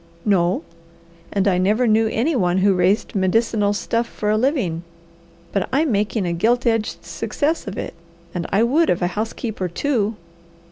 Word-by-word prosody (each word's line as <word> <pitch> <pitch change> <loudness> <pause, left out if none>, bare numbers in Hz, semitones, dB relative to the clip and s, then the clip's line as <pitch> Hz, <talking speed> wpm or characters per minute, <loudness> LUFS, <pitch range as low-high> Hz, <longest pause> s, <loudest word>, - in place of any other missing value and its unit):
"No. 180 -4 +2 0.7
And 200 0 +1
I 180 -2 +3
never 210 +7 +2
knew 220 0 +3
any 250 +8 0
one 180 -6 +1
who 195 +1 +4
raised 185 +3 +1
medicinal 205 +2 +1
stuff 230 +3 -1
for 210 0 -2
a - - +3
living, 215 - 0 0.7
but 195 -2 -1
I'm 290 +2 +2
making 210 -1 0
a 170 - -1
gilt 235 +9 +1
edged 225 -2 0
success 305 -3 -2
of 195 - -5
it, - - -4 0.4
and 175 -2 -3
I 200 +4 +3
would 300 +8 +3
of 175 0 +1
a 175 0 -1
housekeeper, 215 -2 -3
too." 220 - -1
210 Hz, 170 wpm, -21 LUFS, 190-235 Hz, 0.7 s, who